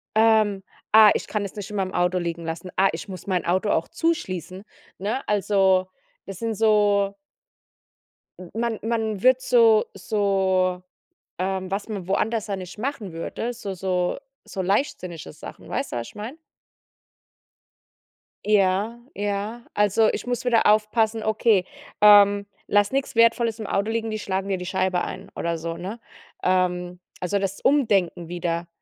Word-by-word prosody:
ähm: 215 -3 +3 0.3
„Ah, 215 -1 +8
ich - - -3
kann 210 -1 -2
es 195 - -8
nicht 205 -2 -6
in - - -6
meinem 190 -1 -2
Auto 180 +1 +1
liegen 170 -1 -4
lassen, 165 +3 -5
ah, 195 +1 +5
ich 165 - -6
muss 185 -3 -8
mein 185 -2 0
Auto 185 +4 +1
auch 160 - +1
zuschließen“, 190 - -2 0.4
ne? 215 +8 -3
Also, 195 -2 +2 0.4
das 195 -2 -8
sind 230 -1 -2
so 205 -2 +3 1.2
M 180 -2 -10
man 230 -1 -1
man 220 -3 -2
wird 255 0 +5
so 230 -4 +5
so 190 -2 0 0.6
ähm, 190 0 -2
was 200 +1 -2
man 200 -5 -5
woanders 215 +3 0
dann 200 -2 -3
nicht 185 +1 -9
machen 225 - -4
würde, 225 +8 -4
so 205 -5 -6
so 180 -1 -1 0.3
so 195 - -5
leichtsinnige 180 - -2
Sachen. - - -11
Weißt - - -3
du, - - -2
was 115 - -4
ich - - -14
meine? 225 +8 -7 2.1
Ja, 205 +2 +2 0.2
ja. 205 +3 -3
Also, 210 +2 +3
ich - - -5
muss 245 0 -2
wieder 235 -2 +3
aufpassen: 215 +1 +2
„Okay, 215 -3 +2 0.4
ähm, 205 -1 +7 0.2
lass 205 0 +3
nix 270 0 -2
Wertvolles 230 -1 +3
im 215 - -4
Auto 200 +2 0
liegen, 225 0 -2
die 215 - -3
schlagen 195 -1 -3
dir 190 -1 0
die 180 - -6
Scheibe 185 -1 0
ein“ - - -7
oder 170 -1 -2
so, 165 +1 -4
ne? 200 +7 -6 0.4
Ähm, 180 -1 0 0.2
also 190 +3 0
das 195 0 -3
Umdenken 195 - +2
wieder. 170 -1 -2
200 Hz, 160 wpm, -24 LUFS, 185-220 Hz, 2.1 s, Ah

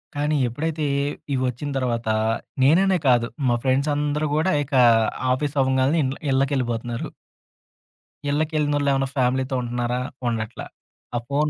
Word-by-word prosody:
కానీ 150 +1 0
ఎప్పుడైతే 155 +5 -2 0.5
ఇవి 130 - 0
వచ్చిన 125 +4 -4
తర్వాత 120 -3 -1 0.6
నేననే 185 +7 +4
కాదు 120 -2 +4 0.2
మా 120 - +3
ఫ్రెండ్స్ 135 +3 +1
అందరూ 150 +1 0
కూడా 160 +5 +2
ఇక 140 +1 -12 0.6
ఆఫీస్ 145 +2 -2
అవ్వంగానే 130 +3 +2
ఇండ్ల్ 135 +1 -3
ఇళ్ళకి 135 +2 +1
ఎళ్ళిపోతున్నారు. 120 -1 -2 1.2
ఇళ్ళకి 155 +2 0
ఎళ్ళినోళ్ళు 145 -1 +1
ఏమైనా 135 0 +1
ఫ్యామిలీతో 130 +1 +1
ఉంటనారా? 120 +1 -2 0.3
ఉండట్ల. 115 0 -3 0.5
ఆ - - +2
ఫోన్ 150 +2 +1
135 Hz, 130 wpm, -23 LUFS, 125-150 Hz, 1.2 s, నేననే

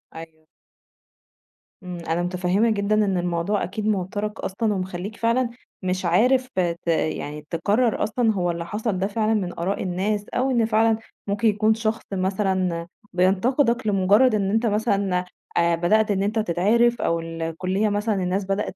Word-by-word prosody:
أيوه. 160 -1 -10 1.4
إمم، 180 -1 -6
أنا 165 +2 0
متفهمة 180 +5 +1
جدًا 210 -1 +1
إن 205 -3 +2
الموضوع 175 +3 -1
أكيد 210 +3 -3
موتّرك 205 +1 -2
أصلًا 210 +3 -1
ومخلّيك 185 +2 -4
فعلًا 235 +2 +1 0.3
مش 185 0 -2
عارف 250 +9 +3
ت 170 -2 -1
يعني 150 -2 -1
تقرر 210 +8 +1
أصلًا 225 0 +1
هو 175 -3 0
اللي 170 0 -5
حصل 210 +2 -2
ده 195 - +1
فعلًا 215 +1 0
من 185 -6 -2
آراء 185 +4 -1
الناس، 200 +3 -1
أو 260 +2 +1
إن 235 -3 +2
فعلًا 225 0 +3 0.3
ممكن 205 +3 +1
يكون 215 +1 +3
شخص 225 0 -2
مثلًا، 185 -3 0 0.3
بينتقدك 230 +7 +2
لمجرّد 205 +4 +4
إن 195 -2 0
أنت 225 +3 +1
مثلًا 200 -4 +1 0.3
آآ، 170 0 +3
بدأت 210 +6 +2
إن 195 -1 +1
أنت 215 +3 0
تتعرِف 220 +6 +2
أو 170 - +1
الكلية 165 +5 -2
مثلًا 210 +1 0
الناس 190 +1 -1
بدأت 195 0 -2
200 Hz, 155 wpm, -23 LUFS, 180-220 Hz, 1.4 s, لمجرّد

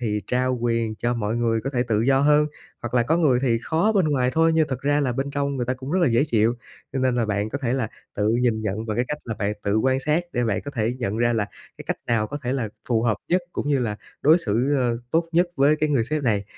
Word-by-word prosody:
thì 105 -3 -1
trao 130 0 0
quyền 115 -2 0
cho 120 +3 -1
mọi 110 -1 -2
người 115 -1 +1
có 135 - -1
thể 125 -3 0
tự 110 -4 0
do 135 +3 +3
hơn, 150 +1 +4 0.4
hoặc 120 0 -5
là 120 - +4
có 155 +7 +1
người 145 -8 +3
thì 120 -4 +2
khó 165 - +1
bên 195 -4 +3
ngoài 130 -4 +1
thôi 165 +2 +3
nhưng 160 -1 +2
thật 130 -2 -3
ra 145 +1 +1
là 130 -4 0
bên 135 +3 -2
trong 140 0 -1
người 125 -2 -2
ta 130 - 0
cũng 130 +2 -8
rất 185 - +2
là 170 - +4
dễ 120 +4 +3
chịu. 115 -4 +2 0.4
Cho 135 - -2
nên 130 -1 +1
là 120 -2 +1
bạn 105 0 -1
có 140 - -3
thể 125 -4 -1
là 130 -4 -1 0.3
tự 105 +1 0
nhìn 120 -3 +1
nhận 110 +1 -3
bằng 110 -1 -2
cái 120 - +1
cách 150 - -3
là 115 - -4
bạn 100 0 0
tự 100 +1 +1
quan 130 +3 +2
sát 155 +5 +1
để 120 -1 0
bạn 105 -4 0
có 145 - -6
thể 115 -3 -1
nhận 110 -4 -2
ra 120 +1 +2
là 110 -3 +1 0.3
cái - - -9
cách - - -1
nào 115 -2 +1
có 145 +6 -5
thể 125 0 -1
là 125 -5 -1 0.2
phù 115 -3 +2
hợp 115 -3 +1
nhất 180 +1 +2
cũng - - -3
như 140 -2 +2
là 110 -4 -2 0.3
đối 155 +4 +6
xử 120 - 0 0.4
tốt 165 +1 +2
nhất 175 +2 +4
với 140 +3 +4
cái 155 0 0
người 135 -6 +2
sếp 150 +4 -2
này. 105 -6 +1
125 Hz, 285 wpm, -23 LUFS, 115-145 Hz, 0.4 s, đối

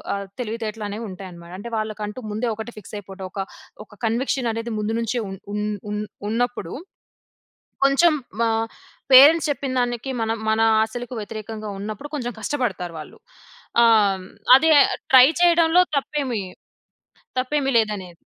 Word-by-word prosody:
ఆహ్, 200 0 -5 0.2
తెలివితేటలనేవి 220 -1 -4
ఉంటాయన్నమాట. 180 -2 -10
అంటే 235 +4 -8
వాళ్ళకంటూ 215 +1 -4
ముందే 225 +3 -1
ఒకటే 225 +2 -7
ఫిక్స్ 210 - -11
అయిపోవడం. 195 -1 -9
ఒక 195 - -7 0.5
ఒక - - -30 0.2
కన్విక్షన్ 240 +2 0
అనేది 230 +1 -4
ముందు 215 +2 -1
నుంచే 230 +1 -1
ఉన్ 195 0 -8
ఉన్ 210 0 -1 0.3
ఉన్ 210 0 -2 0.3
ఉన్నప్పుడు 235 -6 -2 1.1
కొంచెం 275 +5 +5 0.3
ఆహ్, 225 0 +1 0.5
పేరెంట్స్ 290 +6 +8
చెప్పిందానికి 255 -3 -1
మనం 225 0 -1
మన 220 +1 +2 0.2
ఆశలకు 240 +3 -4
వ్యతిరేకంగా 215 0 -6
ఉన్నప్పుడు 215 +8 -6
కొంచెం 245 -4 -3
కష్టపడతారు 210 -8 -2
వాళ్ళు. 155 - -11 0.6
ఆహ్, 230 -1 +6 0.2
హ్మ్, 185 - -11 0.3
అదే 320 +4 +3 0.4
ట్రై 255 0 +10
చేయడంలో 340 0 +5
తప్పేమి 270 -5 -2 1.0
తప్పేమి 270 +1 0
లేదనేది. 205 -6 -1
225 Hz, 130 wpm, -22 LUFS, 210-255 Hz, 1.1 s, ట్రై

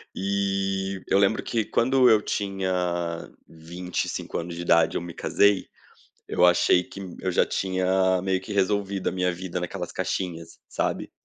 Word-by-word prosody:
E 95 -1 -1
eu 100 - +3
lembro 100 +2 +2
que 115 -3 -1
quando 130 +3 +3
eu 110 -2 +5
tinha 95 -3 -2 0.8
25 85 +3 -5
anos 85 0 -6
de 85 - -5
idade, 85 -1 +3
eu - - -3
me 85 0 -7
casei. 100 +2 +2 0.6
Eu 90 - +2
achei 90 0 +4
que 100 - -11 0.2
eu 95 - -1
já - - +3
tinha 95 0 +1
meio 95 -1 0
que 95 +2 -8
resolvido 100 -1 0
a - - -2
minha 90 -1 0
vida 90 0 -5
naquelas 90 0 -5
caixinhas, 85 -3 -4
sabe. - - -2
95 Hz, 155 wpm, -25 LUFS, 90-100 Hz, 0.8 s, eu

